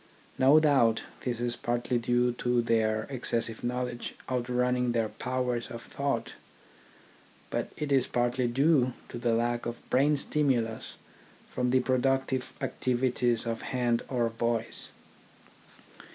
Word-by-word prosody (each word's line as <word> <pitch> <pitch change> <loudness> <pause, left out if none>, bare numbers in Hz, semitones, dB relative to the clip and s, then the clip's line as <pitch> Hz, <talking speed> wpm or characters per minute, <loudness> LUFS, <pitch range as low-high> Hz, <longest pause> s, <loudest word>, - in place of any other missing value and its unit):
No 135 +4 +7
doubt 135 -7 +3 0.2
this 120 -2 -1
is 120 0 -1
partly 120 +1 -1
due 120 +1 +2
to 120 -1 +2
their 110 -1 +1
excessive 115 -3 -2
knowledge 125 0 -3
outrunning 125 0 0
their 115 -2 +1
powers 125 -1 -2
of 115 -1 -7
thought; 140 -5 -2 1.2
but - - -2
it 150 -1 -3
is 135 -2 +3
partly 120 +1 +1
due 130 0 +3 0.2
to 120 - -6
the 120 -1 +1
lack 120 +1 0
of 120 0 -7
brain 145 +3 +4
stimulus 130 -7 0 0.6
from 125 0 0
the 130 +1 +4
productive 130 0 0
activities 125 -2 0
of 115 -1 -2
hand 120 -2 0
or 120 -3 +1
voice. 115 0 -1
125 Hz, 125 wpm, -29 LUFS, 120-130 Hz, 1.2 s, No